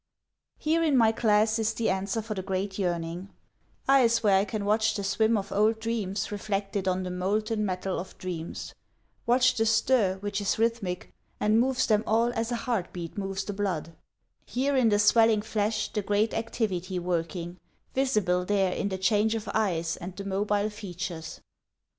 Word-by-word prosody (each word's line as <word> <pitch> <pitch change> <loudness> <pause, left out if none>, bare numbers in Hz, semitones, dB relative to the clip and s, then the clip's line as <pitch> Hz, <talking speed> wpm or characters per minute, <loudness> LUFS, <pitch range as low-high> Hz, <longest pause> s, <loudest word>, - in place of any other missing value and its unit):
Here 325 +2 +1
in 295 -5 +3
my 225 -2 +5
class 220 0 +2
is 220 0 0
the 225 -3 +1
answer 195 +3 -2
for 215 0 -4
the 190 - -4
great 190 +1 -3
yearning: 175 0 -2 0.6
Eyes 235 -4 +4
where 195 -2 +5
I 195 - +1
can 210 0 -4
watch 215 +1 +2
the 200 - -3
swim 220 +3 +2
of 200 -1 -4
old 215 +2 +2
dreams 215 -4 -2
reflected 200 -1 -2
on 185 0 +1
the 180 - -4
molten 210 +4 -1
metal 185 -1 -2
of 185 - -8
dreams, 170 -3 -6 0.5
Watch 250 +1 +4
the 225 -1 +1
stir 220 -3 +3
which 205 +1 -3
is 200 - 0
rhythmic 225 -5 -1 0.3
and 215 +2 +3
moves 260 +1 +2
them 215 -1 +2
all 230 +2 +2
as 225 +1 -2
a - - +1
heart 225 -8 -1
beat 170 -2 -7
moves 195 -1 -3
the 205 - -5
blood, 180 -5 -3 0.5
Here 275 +3 -1
in 250 -4 +4
the 205 - +3
swelling 215 0 +4
flesh 215 0 -1
the 210 - 0
great 205 +2 +1
activity 195 -5 -2
working, 175 0 -3 0.3
Visible 210 -10 +1
there 195 -1 +1
in 200 - -2
the 190 - -3
change 210 +3 +2
of 220 -1 -5
eyes 170 -7 0
and 180 +2 -7
the 200 - -7
mobile 205 +2 0
features. 180 -5 -6
205 Hz, 175 wpm, -27 LUFS, 190-225 Hz, 0.6 s, my